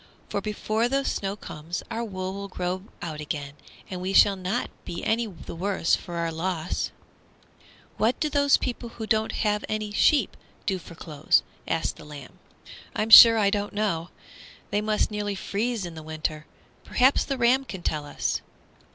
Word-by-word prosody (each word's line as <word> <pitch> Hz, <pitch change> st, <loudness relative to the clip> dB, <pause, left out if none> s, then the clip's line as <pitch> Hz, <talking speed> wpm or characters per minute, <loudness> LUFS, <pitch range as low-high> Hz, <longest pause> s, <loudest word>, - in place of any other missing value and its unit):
For 200 Hz, -, -2 dB
before 215 Hz, +2 st, -1 dB
the 275 Hz, +1 st, 0 dB
snow 195 Hz, 0 st, -2 dB
comes 165 Hz, -3 st, -6 dB
our 230 Hz, -, -2 dB
wool 190 Hz, -3 st, -4 dB
will 200 Hz, 0 st, -6 dB
grow 185 Hz, 0 st, -3 dB, 0.2 s
out 155 Hz, -3 st, -5 dB
again, 145 Hz, -1 st, -4 dB, 0.3 s
and 180 Hz, -1 st, -6 dB
we 190 Hz, +1 st, -2 dB
shall 200 Hz, 0 st, +6 dB
not 190 Hz, +6 st, -2 dB
be 170 Hz, -, -6 dB
any 230 Hz, +1 st, +1 dB
the 185 Hz, -4 st, -9 dB
worse 185 Hz, 0 st, +1 dB
for 175 Hz, -, -8 dB
our 170 Hz, -1 st, -1 dB
loss." 165 Hz, 0 st, -2 dB, 1.1 s
"What 220 Hz, +3 st, +1 dB
do 305 Hz, -, +1 dB
those 285 Hz, -1 st, +4 dB
people 240 Hz, -1 st, -4 dB
who 220 Hz, -, -4 dB
haven't 215 Hz, -1 st, -1 dB
any 215 Hz, -1 st, -2 dB
sheep 245 Hz, +2 st, +3 dB, 0.3 s
do 190 Hz, -2 st, 0 dB
for 170 Hz, -, -12 dB
clothes?" 155 Hz, -2 st, +1 dB, 0.2 s
asked 165 Hz, 0 st, -1 dB
the -, -, -12 dB
lamb. 145 Hz, -3 st, -11 dB, 0.6 s
"I'm 220 Hz, +1 st, -1 dB
sure 230 Hz, 0 st, +12 dB
I 200 Hz, -2 st, +3 dB
don't 205 Hz, -1 st, -2 dB
know. 195 Hz, -5 st, -1 dB, 0.6 s
They 205 Hz, +1 st, +1 dB
must 215 Hz, 0 st, 0 dB
nearly 205 Hz, -1 st, -2 dB
freeze 210 Hz, +2 st, -2 dB
in 170 Hz, -, -7 dB
the 160 Hz, -, -8 dB
winter. 155 Hz, -1 st, -4 dB, 0.4 s
Perhaps 260 Hz, +2 st, +3 dB
the 275 Hz, -, -2 dB
ram 250 Hz, +2 st, +3 dB
can 190 Hz, -9 st, -8 dB
tell 155 Hz, -3 st, -1 dB
us." 145 Hz, -, -2 dB
200 Hz, 170 wpm, -26 LUFS, 170-220 Hz, 1.1 s, sure